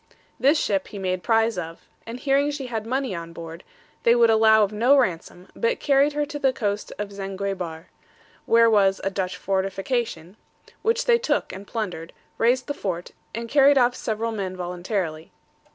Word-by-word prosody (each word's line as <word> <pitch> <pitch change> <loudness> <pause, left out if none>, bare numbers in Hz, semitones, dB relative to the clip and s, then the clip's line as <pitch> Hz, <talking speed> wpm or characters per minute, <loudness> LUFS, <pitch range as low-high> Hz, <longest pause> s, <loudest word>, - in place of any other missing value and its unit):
This 285 +4 +4
ship 195 -2 0
he 205 - -9
made 185 -1 -2
prize 225 -2 +2
of, 165 -1 -8 0.2
and 235 +2 -6
hearing 280 +2 +2
she 290 -2 -4
had 225 -3 -4
money 260 -2 -1
on 170 -1 -7
board, 165 +1 -9 0.4
they 235 - +4
would 235 -1 +5
allow 220 -1 +5
of 200 - 0
no 240 +7 +4
ransom, 180 -5 -1
but 470 +1 0
carried 280 +1 +3
her 295 0 0
to 290 0 -6
the 270 -2 +3
coast 210 -5 -3
of 205 -1 -5
Zanguebar, 195 -4 -5 0.6
where 230 0 +5
was 195 -3 +3
a 195 - -1
Dutch 185 -2 -3
fortification, 195 0 -2 0.4
which 460 +2 +1
they 475 -1 +4
took - - -1
and 195 +1 -9
plundered, 180 -8 -5 0.3
razed 250 +3 +2
the 285 - -3
fort, 180 -10 -4 0.2
and 230 0 -4
carried 280 +2 +5
off 245 -1 +4
several 225 +1 -2
men 190 -4 -4
voluntarily. 175 -2 -4
215 Hz, 175 wpm, -24 LUFS, 185-255 Hz, 0.6 s, would